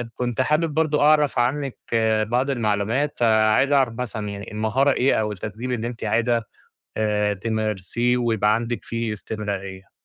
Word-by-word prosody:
كنت 125 0 -1
حابب 155 +3 +1
برضه 155 -2 +1
أعرَف 150 -3 +4
عنِّك 135 +2 -1 0.5
بعض 125 +4 0
المعلومات، 115 +4 0
فعايز 110 +4 +3
أعرف 135 -5 +3
مثلًا 110 -4 -4
يعني، 100 +1 -7
المهارة 110 +6 +1
إيه 130 +1 +2
أو 105 0 -2
التدريب 110 +5 -5
اللي 120 -1 -2
أنتِ 120 -1 -7
عايزة 115 -1 +1 0.5
آآ 105 -1 +1
تمارسيه 110 +3 -1
ويبقى 110 -3 +2
عَندِك 115 -2 -3
فيه 115 -1 -3
استمرارية؟ 100 -3 -6
115 Hz, 145 wpm, -23 LUFS, 105-130 Hz, 0.5 s, أعرَف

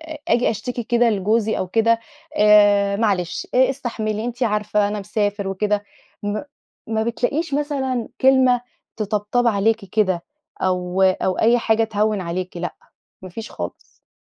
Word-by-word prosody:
آآ 315 -1 -8
آجي 245 -5 +3
أشتكي 240 +3 -4
كده 240 0 +3
لجوزي 215 +2 +1
أو 185 - -2
كده، 230 +2 +3 0.4
"آآ 205 -1 +5
معلش 190 -6 -1
إ 260 +1 +5
إستحملي 225 -5 -3
أنتِ 245 +1 -4
عارفة 210 -2 +1
أنا 210 0 -3
مسافر 205 0 -2
وكده." 205 +1 -1 0.4
م 205 +3 -2 0.5
ما 220 0 0
بتلاقيش 275 +6 -1
مثلًا 270 -5 -1
كلمة 260 -2 +5 0.4
تطبطب 215 +3 0
عليكِ 220 0 +2
كده، 185 -3 0 0.4
أو 180 0 0
أو 185 0 +2
أي 235 +2 +4
حاجة 225 -1 +2
تهوّن 215 -1 0
عليكِ 180 +1 -4
لأ، 175 - -4 0.5
ما 185 - -8
فيش 220 +5 -8
خالص. - - -8
215 Hz, 145 wpm, -21 LUFS, 200-240 Hz, 0.5 s, آآ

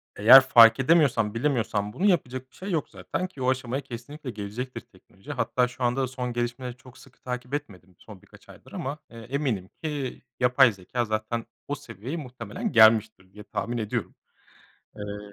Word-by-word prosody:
Eğer 120 +6 +9
fark 115 -2 +7
edemiyorsan, 135 -8 +3
bilemiyorsan 115 -6 -1
bunu 185 +9 -1
yapacak 130 -8 0
bir - - -23
şey 195 +1 -6
yok 160 -3 -1
zaten 185 - -4
ki 145 -7 -12
o 125 - +2
aşamaya 130 +1 -1
kesinlikle 135 +3 -9
gelecektir 110 +5 -6
teknoloji. 100 +10 -14
Hatta 125 -2 0
şu 125 0 -8
anda 120 +2 +1
da 130 - 0
son 125 -1 -4
gelişmeleri 120 +1 -4
çok 130 0 -16
sıkı 130 - -19
takip 125 +1 -6
etmedim 95 -11 -6
son 105 -4 -13
birkaç - - -20
aydır - - -15
ama, 140 +3 -4
ııı, 115 -1 -11
eminim 125 -8 -2
ki 145 -5 -4 0.2
yapay 125 0 +5
zekâ 105 +5 -3
zaten 110 +2 -3 0.2
o 145 - -2
seviyeye 120 - -7
muhtemelen 125 -7 -5
gelmiştir 110 -4 +4
diye 105 0 -11
tahmin 120 +3 -4
ediyorum. 110 -2 -3 0.8
Iıı, 105 0 -7
125 Hz, 170 wpm, -26 LUFS, 110-135 Hz, 0.8 s, Eğer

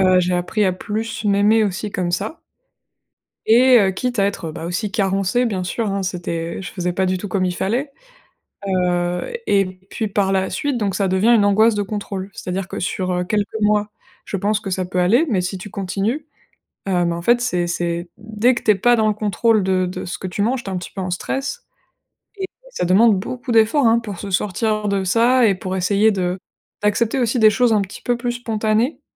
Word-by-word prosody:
Heu, 185 -1 +5
j'ai 180 0 +1
appris 180 +4 0
à 185 - +2
plus 220 +3 -4
m'aimer 205 +2 +4
aussi 205 +1 -2
comme 180 -2 -1
ça 210 - -3 1.1
et 245 +3 +6
heu, 195 -3 +3
quitte 245 +3 -3
à 195 - +4
être, 200 -5 -2
beh, 160 - -8
aussi 180 +5 -3
carencée, 195 +3 +1
bien 195 -6 -2
sûr 210 +4 -2
hein, 195 0 -1
c'était 170 -1 -4
je 185 - -7
faisais 180 -1 -2
pas 190 +1 +1
du 185 0 0
tout 205 - -6
comme 190 0 0
il 180 -1 -1
fallait. 245 +11 -2 0.8
Heu 180 - 0
et 195 -1 +3 0.2
puis 220 - -2
par 200 -1 0
la 190 0 0
suite, 275 +7 -1
donc 205 -4 -1
ça 195 0 0
devient 190 +5 +2
une 215 -3 +4
angoisse 215 +3 +4
de 205 - -1
contrôle. 200 -1 -5
C'est-à-dire 185 +1 -4
que - - -6
sur, 185 0 -2
heu, 180 0 0
quelques 210 +3 -2
mois, 210 0 +2 0.4
je 200 - -3
pense 205 +2 0
que 210 -2 -6
ça 185 -1 -1
peut 180 0 -2
aller, 230 - +4
mais 190 -5 +1
si 180 +2 -3
tu 195 +2 -9
continues, 205 - -2 0.6
heu, 175 -2 +2
mais 170 - 0
en 170 - -5
fait, 240 +7 +3
c'est 180 -8 0
c'est 170 0 -2
dès 220 +3 +1
que - - -5
tu 215 - +5
es - - +3
pas 240 +4 +3
dans 220 -1 +2
le 215 - +2
contrôle 215 +1 +1
de 185 -1 +1
de 180 - -5
ce 180 - -5
que 190 - -6
tu 185 +3 -3
manges, 240 +4 0
tu - - -4
es 190 - -4
un - - -1
petit 180 - -7
peu 195 - -8
en 185 - -3
stress 275 - -3 0.7
et 385 - -3 0.3
ça - - -2
demande 200 +3 +4
beaucoup 245 +5 -5
d'efforts, 230 +4 +4
hein. 230 +1 +4
Pour 205 -6 -7
se 200 - -6
sortir 210 +3 0
de 200 -1 0
ça 235 +5 +4
et 200 - +3
pour 190 -1 -4
essayer 200 +4 +3
de 180 -1 -2 0.4
d'accepter 215 +4 +1
aussi 245 0 +1
des 220 -1 +7
choses 240 +2 +2
un 210 - +3
petit 195 0 -6
peu 240 -1 0
plus 240 0 -2
spontanées. 225 +2 -1
200 Hz, 225 wpm, -20 LUFS, 185-225 Hz, 1.1 s, des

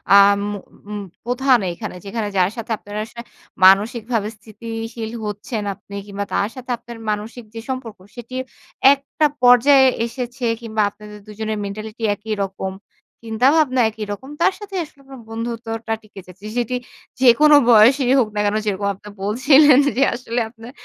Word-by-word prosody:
আম 200 0 +6 0.2
উ - - -9 0.3
উম 210 -1 -4 0.2
প্রধান 250 0 +3
এইখানে 170 - -7
যেখানে 210 +1 -3
যার 180 +1 +4
সাথে 230 0 -6
আপনার 205 0 -11
আশায় 235 +1 -11 0.4
মানসিকভাবে 215 +3 +3
স্থিতি 215 +2 -13 0.3
শীল 225 -1 -5
হচ্ছেন 210 +2 -4
আপনি 200 - -12
কিংবা 200 0 -4
তার 200 - +1
সাথে 255 -1 -10
আপনার 235 0 -11
মানসিক 215 +4 -4
যে 225 - -4
সম্পর্ক 255 -5 -5 0.2
সেটি, 240 +1 -9 0.6
একটা 280 +2 -1 0.2
পর্যায়ে 265 +2 +6 0.2
এসেছে 245 +1 -5 0.2
কিংবা 220 -1 -2
আপনাদের 210 0 -12
দুজনের 215 0 -4
মেন্টালিটি 215 +3 -7
একই 215 +2 -5
রকম। 190 0 -5 0.5
চিন্তা-ভাবনা 255 +4 +3
একই 220 -1 -6
রকম। 260 +6 -10
তার 375 - +4
সাথেই 395 -2 -5
আসলে 295 -2 -16
আপনার 270 -1 -11
বন্ধুত্বটা 225 0 -4
টিকে 205 -2 -12
যাচ্ছে। 185 +3 -14
সেটি 245 +1 -1 0.5
যেকোনো 280 +5 +6
বয়সেরই 245 +4 +6
হোক 240 - +2
না - - -1
কেন, 205 +1 +1
যেরকম 200 -1 -1
আপনি 210 +2 -13
বলছিলেন 270 +6 +5 0.2
যে 275 - +4
আসলে 240 0 -3
আপনার 230 +1 -12
225 Hz, 155 wpm, -20 LUFS, 210-250 Hz, 0.6 s, আম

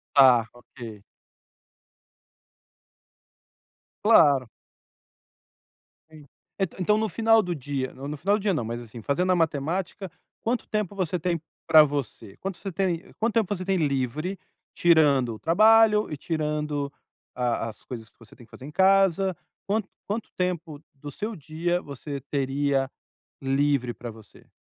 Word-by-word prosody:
Tá, 125 -5 +7
Ok. 115 -4 -11 3.0
Claro. 145 - +5 1.6
En 155 -2 -14 0.4
e - - +2 0.2
então, 210 +4 +3
no 220 0 0
final 225 +3 +3
do 180 -1 -2
dia 135 -2 -4
no 135 +2 -8
no 150 0 -5
final 200 +7 +2
do - - -7
dia, 200 -2 +1
não, 120 -8 -1
mas, 120 +1 -4
assim, 115 0 -10
fazendo 180 +6 +1
a - - +4
matemática, 165 +4 -1 0.3
quanto 235 +1 -1
tempo 210 -2 -2
você 180 -2 -1
tem 170 0 -1 0.3
pra 155 -1 +9
você? 140 -8 -4
Quanto 195 -1 -5
você 195 - -6
tem 175 -2 -2
quanto 230 0 +1
tempo 215 -3 +2
você 185 - -6
tem 195 -1 +1
livre, 150 +4 -1 0.3
tirando 145 -9 +4
o - - -13
trabalho 215 +4 +5
e 150 - -4
tirando 150 -2 -2 0.4
a 120 -2 -1
as 110 - -13
coisas 115 -4 -8
que - - -41
você 115 - -17
tem 120 - -15
que - - -30
fazer 130 - -11
em 150 - -8
casa, 190 0 +3 0.3
quanto 205 0 0 0.2
quanto 215 +2 -4
tempo 170 -5 -3
do 145 +1 -9
seu 215 +7 -4
dia 165 +4 -2
você 140 0 -7
teria 135 0 0 0.5
livre 135 -2 +1
pra 120 - -8
você? 110 -2 -17
155 Hz, 150 wpm, -26 LUFS, 135-190 Hz, 3.0 s, pra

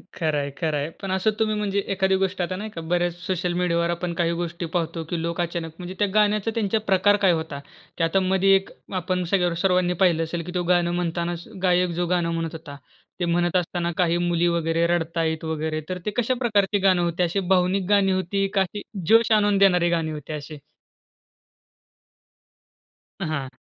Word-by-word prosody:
खरंय, 150 -4 -1
खरंय. 155 -3 -1
पण 195 -2 -4
असं 190 +3 +2
तुम्ही 215 -1 +1
म्हणजे 205 -1 -1
एखादी 190 0 +2
गोष्ट 190 0 -1
आता 180 +1 -2
नाही 210 +3 -5
का 170 -6 -7
बऱ्याच 175 +1 0
सोशल 180 -1 -1
मीडियावर 170 -1 +1
आपण 170 0 -2
काही 170 0 0
गोष्टी 170 0 -4
पाहतो 165 -1 -1
की 170 -2 -2
लोक 170 +1 -2
अचानक 170 -1 -3
म्हणजे 180 +1 -7
त्या 205 - +3
गाण्याचा 210 +1 +2
त्यांचा 220 -1 +1
प्रकार 200 +1 +4
काय 185 - +6
होता? 160 -4 -3 0.4
त्या 165 - +2
आता 195 +4 +2
मध्ये 190 +1 +3
एक 195 0 0 0.3
आपण 180 +1 -1
सगळ्या 180 +1 +1
वर 170 - -1
सर्वांनी 180 -1 +2
पाहिलं 170 -4 +3
असेल 165 +1 -4
की 180 - -6
तो 180 - 0
गाणं 175 0 +2
म्हणतानाच 170 0 -2 0.2
गायक 180 -1 +3
जो 175 - +1
गाणं 175 -1 +1
म्हणत 165 0 -2
होता, 160 -3 -9 0.4
ते 175 - 0
म्हणत 175 +1 +1
असताना 175 -1 -1
काही 175 -2 +2
मुली 175 0 +1
वगैरे 165 -1 +1
रडतायत 165 -1 -1
वगैरे 160 0 -2
तर 185 - -2
ते 210 - -1
कशा 245 +1 +2
प्रकारची 210 -4 +2
गाणं 190 -2 +3
होते 175 +1 0
अशी 175 +3 0
भावनिक 185 0 +1
गाणी 200 -2 +4
होती 190 +1 0
का 195 - +3
अशी 190 +2 -3 0.3
जोश 225 +2 +5
आणून 205 -2 +4
देणारे 180 -3 +4
गाणी 165 -2 0
होती 150 0 -7
अशी? 150 0 -7 2.6
हां. 155 -6 -2
175 Hz, 190 wpm, -24 LUFS, 165-190 Hz, 2.6 s, काय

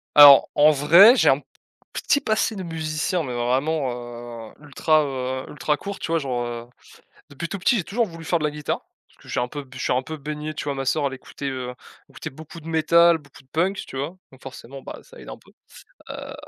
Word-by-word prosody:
Alors, 145 -2 +9
en 150 +1 +6
vrai, 170 - +7
j'ai - - +4
un - - +4
pt - - -23 0.5
petit 285 - +1
passé 220 0 0
de 190 - -5
musicien 160 +1 -2
mais 125 - -5
vraiment, 130 +4 0 0.6
heu, - - -20
ultra, 155 +2 +2
heu, 130 -1 -4
ultra 150 0 -1
court, 200 +3 -7
tu - - -4
vois? 165 - +2
Genre, 130 -4 -2
heu, 120 0 -6 0.6
depuis 165 +4 -5
tout 200 - -4
petit, 235 +7 +3
j'ai 190 - -1
toujours 230 +7 0
voulu 165 -3 -10
faire 170 - +1
de 155 - -4
la 150 - +2
guitare 150 -1 -3 0.3
parce - - -28
que - - -17
j'ai - - -2
un 125 - -1
peu 145 +2 -7
b 130 -1 -18
j'ai 130 - -2
un 125 - +1
peu 155 +3 -7
baigné, 150 +1 -5
tu - - -6
vois? 145 - -1
Ma 135 0 -4
sœur, 145 +2 +1
elle 135 - -6
écoutait 140 +1 -6 0.6
écoutait 155 - -7
beaucoup 160 +3 -11
de 160 - -12
métal, 170 +1 +4
beaucoup 140 -3 -18
de - - -33
punk, 185 +5 0
tu 135 - -8
vois? 145 +7 -4 0.2
Donc 130 - -18
forcément 135 0 -10
bah, - - -8
ça - - -17
aide - - -11
un - - -8
peu. - - -22 0.6
Heu, - - -7
150 Hz, 235 wpm, -23 LUFS, 135-165 Hz, 0.6 s, Alors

